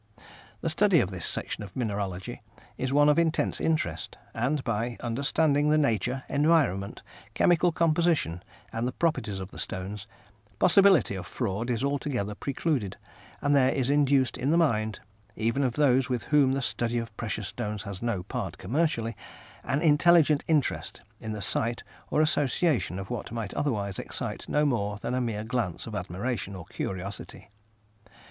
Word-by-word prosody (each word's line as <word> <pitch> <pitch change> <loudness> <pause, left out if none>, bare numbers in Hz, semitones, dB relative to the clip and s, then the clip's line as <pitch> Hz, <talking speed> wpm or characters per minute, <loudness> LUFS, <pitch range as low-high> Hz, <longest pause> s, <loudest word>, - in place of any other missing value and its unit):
The 165 - 0
study 195 0 +4
of 95 - 0
this 90 -3 -3
section - - -3
of 95 -3 -11
mineralogy 100 -2 -3 0.3
is 130 0 -2
one 145 +1 +5
of 150 +2 +5
intense 165 -1 +1
interest, 90 - -1 0.2
and 130 +5 0
by 115 +1 -2
understanding 145 +4 +1
the 155 - +4
nature, 125 -2 +1
environment, 145 - +1 0.3
chemical 175 0 +4
composition 160 - +1 0.3
and 115 +2 -1
the 125 - -3
properties 155 - -1
of 95 +1 -7
the - - -9
stones, 95 +2 -5 0.5
possibility 190 - +5
of 95 -2 -6
fraud 115 0 -2
is 120 +1 0
altogether 140 -7 -1
precluded, 130 - -2 0.5
and 145 0 +3
there 130 -1 +5
is 135 0 0
induced 140 -3 +3
in 135 - 0
the 165 - +4
mind 110 -10 +1 0.3
even 115 +5 0
of 125 -3 +1
those 135 -2 +3
with 125 -2 -1
whom 140 -3 +3
the 135 0 -1
study 120 -1 -1
of 115 -2 -4
precious 105 -3 -3
stones 105 0 -4
has 100 -3 -7
no 115 -6 -1
part - - -4
commercially 115 - 0 0.5
an 140 +4 -1
intelligent 155 -1 +5
interest 150 -10 0 0.2
in 110 -2 -5
the 105 -2 -4
sight 115 +6 -1 0.3
or 155 - +2
association 150 - +1
of 95 +4 -6
what 120 -3 -4
might 115 -4 -4
otherwise 105 -9 -1
excite - - -5
no 150 +1 +2
more 105 -7 0
than 115 - -4
a 130 - +1
mere 110 -3 -2
glance 115 -6 -2
of 115 - -7
admiration 100 +2 -3
or 90 -3 -8
curiosity. 95 +3 -6
125 Hz, 160 wpm, -28 LUFS, 105-145 Hz, 0.5 s, one